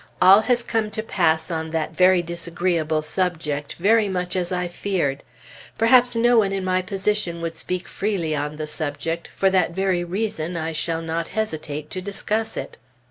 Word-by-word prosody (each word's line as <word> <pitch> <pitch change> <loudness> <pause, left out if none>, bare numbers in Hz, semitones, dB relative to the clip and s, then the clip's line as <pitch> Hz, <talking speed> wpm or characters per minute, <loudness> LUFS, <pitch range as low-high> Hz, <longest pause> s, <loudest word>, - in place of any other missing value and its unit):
All 190 +3 +8
has 240 +1 +1
come 220 -2 -1
to 220 - -1
pass 160 -6 +1
on 160 -1 -2
that 160 0 -2
very 185 0 +5
disagreeable 170 -2 -1
subject 155 -4 -2
very 210 +3 +3
much 180 -1 -2
as 180 -1 -1
I 180 -1 -1
feared. 175 -6 -1 0.6
Perhaps 245 +1 +5
no 235 0 +5
one 200 -3 +2
in 195 -1 -2
my 185 0 +2
position 195 -2 -1
would 165 0 -3
speak 180 +2 -3
freely 185 -7 -1
on 150 +1 -3
the 155 0 -4
subject; 155 +2 -3
for 195 -1 +3
that 180 -3 +2
very 190 -2 +1
reason 175 -3 -2
I 160 0 -2
shall 165 +1 -2
not 165 0 -2
hesitate 155 -8 -4
to 185 - -4
discuss 210 +3 -2
it. - - -6
180 Hz, 175 wpm, -23 LUFS, 160-195 Hz, 0.6 s, All